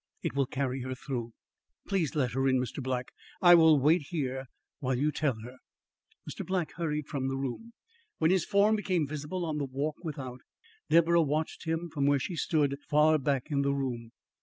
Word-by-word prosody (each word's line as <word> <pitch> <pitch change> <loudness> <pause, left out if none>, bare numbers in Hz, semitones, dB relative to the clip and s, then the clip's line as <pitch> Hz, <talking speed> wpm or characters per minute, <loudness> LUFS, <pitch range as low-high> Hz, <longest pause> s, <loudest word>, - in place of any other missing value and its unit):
It - - -2
will 140 -1 +1
carry 135 -1 -2
her 130 +1 -4
through." 125 -3 -5 0.6
"Please 180 -8 0
let 130 -5 +1
her 135 +2 +1
in, 130 -1 +3
Mr. 125 +3 -4
Black. 125 -1 -3 0.3
I 175 -1 +8
will 160 -3 +7
wait 150 +2 +3
here 135 -5 -2 0.3
while 130 -1 -1
you 150 +4 +1
tell 145 -5 0
her." 125 +2 -10 0.7
Mr. - - -5
Black 185 -4 -1
hurried 150 -3 -2
from 135 -2 -3
the 135 0 -2
room. 135 - -5 0.4
When 160 +1 +3
his 185 -2 +3
form 205 +2 +3
became 185 -6 0
visible 150 +5 -4
on 155 -2 -2
the 140 - -1
walk 140 +3 -3
without, 130 -6 -6 0.5
Deborah 170 +1 +5
watched 155 +2 -2
him 165 +1 -1
from 140 -2 +1
where 145 0 +4
she 155 +6 -4
stood 145 -3 +1
far 155 +1 +4
back 135 +1 -1
in 140 -1 +2
the 140 0 +1
room. 120 -4 -3
145 Hz, 190 wpm, -30 LUFS, 130-160 Hz, 0.7 s, I